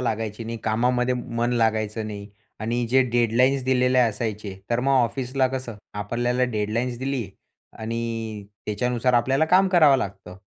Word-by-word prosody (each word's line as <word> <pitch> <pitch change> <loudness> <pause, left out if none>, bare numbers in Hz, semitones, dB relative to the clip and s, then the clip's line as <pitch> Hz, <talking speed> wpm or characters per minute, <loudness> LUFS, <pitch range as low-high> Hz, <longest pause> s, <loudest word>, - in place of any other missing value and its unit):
लागायची 110 -2 -3
नाही, 115 +1 -4
कामामध्ये 125 +3 +1
मन 120 0 -2
लागायचं 110 -2 0
नाही 100 -1 -7 0.3
आणि 120 +2 -1
जे 130 +1 +5
डेडलाईन्स 120 +3 +2
दिलेले 130 0 +3
असायचे. 105 -4 -1
तर 120 0 +2
मग 135 +2 +1
ऑफिसला 130 +3 0
कसं 130 -4 -5 0.3
आपल्याला 120 +4 0
डेडलाईन्स 115 +3 -1
दिली 130 -5 -2 0.5
आणि 115 -2 -4 0.2
त्याच्यानुसार 125 +3 0
आपल्याला 135 +5 +3
काम 185 +4 +4
करावं 155 -7 +6
लागतं. 95 -5 -6
120 Hz, 135 wpm, -24 LUFS, 110-125 Hz, 0.5 s, करावं